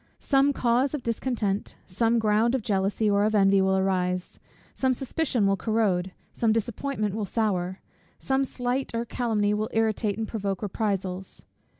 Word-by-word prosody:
Some 275 0 +3
cause 255 +2 +1
of 275 - -6
discontent, 230 -4 -2
some 230 +5 +1
ground 220 +2 +2
of 255 - -2
jealousy 200 +1 0
or 200 0 +3
of 215 +1 +1
envy 195 -1 +5
will 190 0 +2
arise, 185 -1 -1 0.3
some 260 -1 +1
suspicion 265 -3 0
will 195 0 +3
corrode, 195 -4 0 0.2
some 225 -2 +1
disappointment 225 -1 -1
will 210 -1 -3
sour, 190 -5 -1 0.4
some 270 0 0
slight 250 -1 -2
or 230 +1 -1
calumny 220 -4 0
will 215 +1 -1
irritate 220 -2 +1
and 225 -1 -2
provoke 200 -3 -3
reprisals. 195 -2 -3
215 Hz, 155 wpm, -26 LUFS, 195-235 Hz, 0.4 s, envy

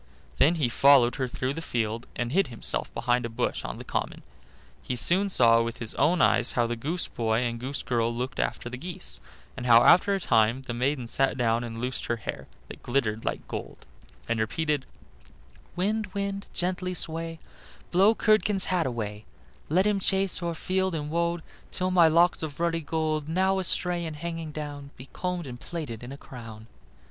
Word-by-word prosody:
Then 165 +5 +4
he 150 -7 +1
followed 130 0 +5
her 130 -2 -1
through 130 +2 -3
the 165 - -5
field, 115 -5 -2
and 120 0 -2
hid 195 +6 +2
himself 115 -3 -1
behind 125 0 +1
a 115 - -3
bush 120 +2 -2
on - - -5
the - - -8
common. - - -3 0.6
He 125 - -3
soon 185 - +3
saw 115 -9 +5
with 115 +1 -3
his 115 -2 -4
own 165 +5 +3
eyes - - +3
how 120 - +2
the 120 0 -2
goose 155 +9 -2
boy 115 0 0
and 120 -1 -2
the 125 - -5
goose 140 - -3
girl 115 -2 0
looked 125 +3 -4
after - - -2
the 125 +1 -6
geese, 130 - -4 0.3
and 125 - -5
how 115 0 +7
after 200 +3 +6
a - - -1
time 115 - +2
the 125 - -5
maiden 130 +2 -1
sat 135 +3 +1
down 115 -1 +1
and 115 -1 -6
loosed 125 +1 -3
her 120 - 0
hair, 115 - -6 0.2
that - - -11
glittered 115 -4 -1
like - - -3
gold, - - -7 0.4
and 115 - 0
repeated: 150 +5 -1 0.9
"Wind, 210 +4 0
wind, 200 0 -3
gently 180 0 -2
sway, 165 0 -2 0.5
Blow 195 +5 +5
Curdken's 215 -3 +4
hat 170 -6 +1
away; 110 -3 -4 0.4
Let 180 +6 +3
him 210 -1 +2
chase 195 -1 +2
o'er 170 -1 -2
field 190 +1 -1
and 150 -1 -4
wold 170 0 0 0.3
Till 185 0 -2
my 175 -3 +6
locks 170 +3 +3
of 155 -2 -6
ruddy 170 -1 0
gold 155 -1 -2
Now 190 +3 +2
astray 180 -1 +2
and 155 - -6
hanging 165 0 -5
down, 145 -2 -6
Be 130 +1 -11
combed 180 -2 -3
and 125 -2 -8
plaited 150 -10 -6
in 120 +2 -8
a 140 - -7
crown." 115 -5 -10
145 Hz, 195 wpm, -27 LUFS, 120-175 Hz, 0.9 s, how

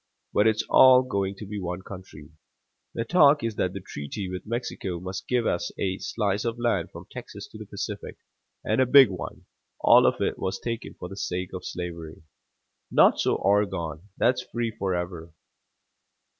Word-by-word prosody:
But 105 - +4
it's 110 0 +2
all 130 -1 +7
going 100 -6 -2
to 105 - -8
be 105 +1 -5
one 90 0 -4
country. 90 -6 -11 0.6
The 115 - -2
talk 145 -4 +5
is 115 -1 -1
that 90 0 0
the 100 - -6
treaty 90 +4 -6
with 90 +3 -6
Mexico 105 -6 -3
must 95 +2 -6
give 125 -2 +1
us 85 - -1
a 95 -1 -1
slice 100 -2 -1
of 115 0 -2
land 115 -8 0
from - - -11
Texas - - -9
to - - -12
the - - -9
Pacific, - - -6 0.5
and - - +1
a 130 - +3
big 135 -3 +8
one; 90 - -7 0.3
all - - +6
of - - +1
it - - -1
was 95 0 -2
taken 115 +1 -5
for - - -7
the 95 - -9
sake 90 -1 -4
of 90 -1 -6
slavery. 85 -3 -6 0.7
Not - - +5
so - - +2
Oregon 95 -4 0
that's 125 +1 +2
free 120 -2 -3
forever. 90 -4 -4
100 Hz, 175 wpm, -26 LUFS, 90-115 Hz, 0.7 s, big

